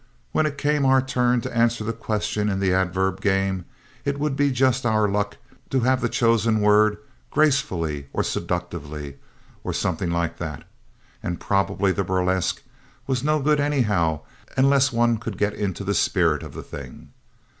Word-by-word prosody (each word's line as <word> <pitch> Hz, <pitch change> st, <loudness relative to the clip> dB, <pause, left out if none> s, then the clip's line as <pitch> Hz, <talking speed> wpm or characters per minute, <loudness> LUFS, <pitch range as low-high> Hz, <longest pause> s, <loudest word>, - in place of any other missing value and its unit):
When 155 Hz, -, +2 dB
it 140 Hz, -2 st, -5 dB
came 150 Hz, 0 st, +1 dB
our 135 Hz, 0 st, +5 dB
turn 125 Hz, -2 st, +1 dB
to -, -, -6 dB
answer 115 Hz, -1 st, +2 dB
the 115 Hz, +2 st, -2 dB
questions 105 Hz, -1 st, -1 dB
in 95 Hz, -, -1 dB
the 95 Hz, -2 st, +2 dB
adverb 95 Hz, +1 st, 0 dB
game 95 Hz, -2 st, 0 dB, 0.4 s
it 140 Hz, 0 st, -2 dB
would 150 Hz, -2 st, 0 dB
be 145 Hz, 0 st, +2 dB
just 130 Hz, 0 st, +2 dB
our 110 Hz, -3 st, +2 dB
luck 105 Hz, +1 st, -1 dB, 0.3 s
to 130 Hz, -, +1 dB
have 130 Hz, +2 st, +2 dB
the 120 Hz, -, 0 dB
chosen 115 Hz, -1 st, +2 dB
word 105 Hz, 0 st, +4 dB, 0.3 s
"gracefully" 85 Hz, -, +1 dB
or -, -, 0 dB
"seductively" 75 Hz, -5 st, -4 dB, 0.5 s
or -, -, -3 dB
something 90 Hz, -, -1 dB
like 85 Hz, -1 st, -1 dB
that, 80 Hz, -4 st, -5 dB, 0.6 s
and 85 Hz, -1 st, -3 dB
probably 100 Hz, 0 st, +1 dB
the 100 Hz, +1 st, -1 dB
burlesque 95 Hz, 0 st, 0 dB, 0.4 s
was 130 Hz, -2 st, -1 dB
no 155 Hz, +1 st, +2 dB
good 150 Hz, +1 st, +2 dB
anyhow 105 Hz, -, +1 dB, 0.4 s
unless 135 Hz, 0 st, +4 dB
one 120 Hz, 0 st, +2 dB
could 110 Hz, -3 st, -6 dB
get 105 Hz, +1 st, +1 dB
into 100 Hz, -2 st, -3 dB
the 100 Hz, +1 st, 0 dB
spirit -, -, +2 dB
of -, -, -9 dB
the -, -, -6 dB
thing. -, -, -10 dB
105 Hz, 165 wpm, -23 LUFS, 95-130 Hz, 0.6 s, our